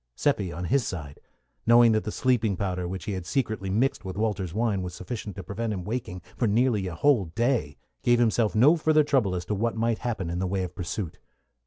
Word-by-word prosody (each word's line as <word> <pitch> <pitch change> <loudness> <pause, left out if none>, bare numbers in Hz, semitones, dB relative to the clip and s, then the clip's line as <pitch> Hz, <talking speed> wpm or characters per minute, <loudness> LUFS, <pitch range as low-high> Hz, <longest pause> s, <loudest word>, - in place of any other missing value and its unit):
Seppi, 105 -11 0
on 90 - -5
his 135 +6 +2
side, 75 -8 -6 0.5
knowing 120 0 +7
that 110 -1 +1
the 105 - -2
sleeping 115 -6 +1
powder 90 -2 -2
which 95 +1 -5
he - - -3
had 95 -2 -3
secretly 110 -8 -1
mixed 115 +7 +1
with 95 -1 -6
Walter's 105 -5 -1
wine 105 -1 0
was 90 -1 -5
sufficient 105 +2 -6
to 95 - -7
prevent 110 +5 -3
him 95 -4 -3
waking 100 -4 -4
for 120 - +1
nearly 110 -2 +2
a 85 - -5
whole 130 - +3
day, 110 - -1 0.2
gave 120 0 +4
himself 115 -2 +2
no 135 +10 +6
further 155 -1 +3
trouble 130 -11 +1
as 90 -1 -4
to 105 - -2
what 115 +3 -1
might 115 0 0
happen 110 -8 -3
in 85 - -2
the 95 - 0
way 95 0 -1
of 90 - -5
pursuit. 90 -1 -5
105 Hz, 220 wpm, -26 LUFS, 95-120 Hz, 0.5 s, knowing